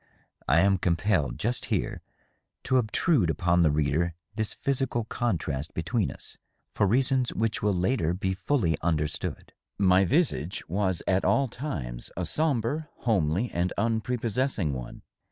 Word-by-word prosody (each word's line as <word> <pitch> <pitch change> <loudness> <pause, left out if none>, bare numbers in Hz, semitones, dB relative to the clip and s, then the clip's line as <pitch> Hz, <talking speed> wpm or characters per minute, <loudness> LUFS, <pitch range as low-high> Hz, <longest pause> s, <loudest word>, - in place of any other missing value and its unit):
I 75 +5 +5
am 95 -1 +3
compelled, 85 - +1
just 120 +3 -1
here, - - -2 0.6
to 130 - +2
obtrude 120 - +2
upon 85 +2 +2
the 80 - +5
reader 75 +3 +1 0.2
this 110 0 -2
physical 135 -3 -1
contrast 80 - -2
between 100 +4 0
us, - - -10 0.3
for 100 - +2
reasons 130 +3 +2
which 110 -1 0
will 105 - +2
later 90 -2 +1
be 95 0 -1
fully 95 - +1
understood. 75 -2 -2 0.2
My 95 -1 +5
visage 100 - 0
was 95 0 0
at 95 0 +2
all 140 -1 +3
times 70 - -5
a 90 - -1
sombre, 150 - 0
homely 100 0 +1
and 90 +1 -1
unprepossessing 115 - 0
one. 65 -2 -7
95 Hz, 135 wpm, -27 LUFS, 85-120 Hz, 0.6 s, I